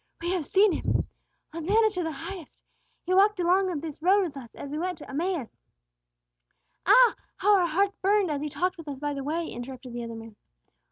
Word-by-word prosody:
"We 345 Hz, +1 st, -2 dB
have 360 Hz, -6 st, -1 dB
seen 400 Hz, +1 st, +4 dB
Him. -, -, 0 dB, 0.5 s
Hosanna 415 Hz, +7 st, +2 dB
to 365 Hz, -3 st, -3 dB
the 325 Hz, -1 st, -2 dB
Highest! 345 Hz, +3 st, -8 dB, 0.4 s
He 365 Hz, -, -1 dB
walked 400 Hz, +1 st, +4 dB
along 365 Hz, +2 st, +3 dB
this 310 Hz, -2 st, -7 dB
road 390 Hz, +4 st, +4 dB
with 325 Hz, -6 st, -4 dB
us 245 Hz, -4 st, -10 dB
as 280 Hz, -, -8 dB
we 300 Hz, -, -3 dB
went 360 Hz, 0 st, -2 dB
to 300 Hz, -, -11 dB
Emmaus." 315 Hz, -2 st, -3 dB, 1.3 s
"Ah, -, -, +7 dB, 0.2 s
how 410 Hz, +2 st, +4 dB
our 360 Hz, -3 st, +3 dB
hearts 390 Hz, +5 st, +1 dB
burned 395 Hz, -2 st, +2 dB
as 285 Hz, -1 st, -2 dB
He 300 Hz, -, -3 dB
talked 365 Hz, +5 st, -1 dB
with 325 Hz, -, -10 dB
us 280 Hz, -2 st, -6 dB
by 290 Hz, 0 st, -2 dB
the 275 Hz, -1 st, -5 dB
way!" 325 Hz, +4 st, -2 dB
interrupted 250 Hz, 0 st, -8 dB
the 240 Hz, 0 st, -4 dB
other 230 Hz, 0 st, -6 dB
man. 225 Hz, -1 st, -10 dB
340 Hz, 205 wpm, -27 LUFS, 285-385 Hz, 1.3 s, Ah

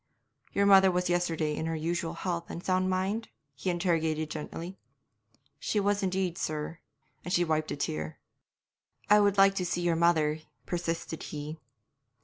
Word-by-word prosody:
'Your 200 Hz, -, +2 dB
mother 195 Hz, -1 st, +7 dB
was 180 Hz, -1 st, 0 dB
yesterday 165 Hz, -3 st, 0 dB
in 160 Hz, -, -3 dB
her 165 Hz, -, -1 dB
usual 165 Hz, +1 st, -2 dB
health 170 Hz, -1 st, -3 dB
and 170 Hz, -, -7 dB
sound 185 Hz, 0 st, +2 dB
mind?' 190 Hz, +5 st, -1 dB, 0.3 s
he 140 Hz, +7 st, -3 dB
interrogated 160 Hz, -3 st, 0 dB
gently. 165 Hz, +4 st, -6 dB, 0.8 s
'She 210 Hz, -, 0 dB
was 205 Hz, 0 st, +1 dB
indeed, 185 Hz, -2 st, -1 dB
sir,' 155 Hz, +2 st, -3 dB, 0.4 s
and 180 Hz, -, -5 dB
she 175 Hz, -1 st, +3 dB
wiped 155 Hz, -1 st, 0 dB
a -, -, -2 dB
tear. 80 Hz, -, -3 dB, 0.9 s
'I 210 Hz, -, +8 dB
would 200 Hz, -1 st, +3 dB
like 195 Hz, 0 st, +7 dB
to 195 Hz, -, -1 dB
see 175 Hz, 0 st, -1 dB
your 175 Hz, -1 st, +2 dB
mother,' 160 Hz, -2 st, +3 dB, 0.3 s
persisted 165 Hz, -2 st, -3 dB
he. 150 Hz, +1 st, -6 dB
175 Hz, 155 wpm, -29 LUFS, 160-185 Hz, 0.9 s, I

